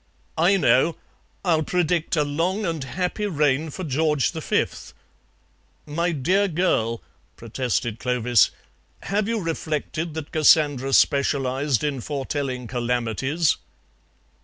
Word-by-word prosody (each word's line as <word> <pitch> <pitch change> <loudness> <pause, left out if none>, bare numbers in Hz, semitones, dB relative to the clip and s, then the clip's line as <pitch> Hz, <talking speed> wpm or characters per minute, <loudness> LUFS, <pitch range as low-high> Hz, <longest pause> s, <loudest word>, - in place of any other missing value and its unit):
"I 185 +4 +4
know. 140 +1 +3 0.5
I'll 165 -3 +3
predict 170 0 0
a 150 - +2
long 170 +8 -1
and 165 -5 -2
happy 180 - -2
reign 150 -3 +1
for 185 +6 -6
George 150 -1 +1
the 160 - -6
Fifth." - - -2 0.9
"My 170 +4 -1
dear 185 +7 +1
girl," 155 - 0 0.3
protested 115 -1 -2
Clovis, 125 -1 +3 0.5
"have 200 +1 -1
you 230 -1 0
reflected 160 -1 -3
that 160 -2 -6
Cassandra 145 -3 +3
specialized 135 -1 +2
in 140 -4 -1
foretelling 135 -2 -3
calamities?" 125 +6 0
150 Hz, 110 wpm, -23 LUFS, 130-170 Hz, 0.9 s, I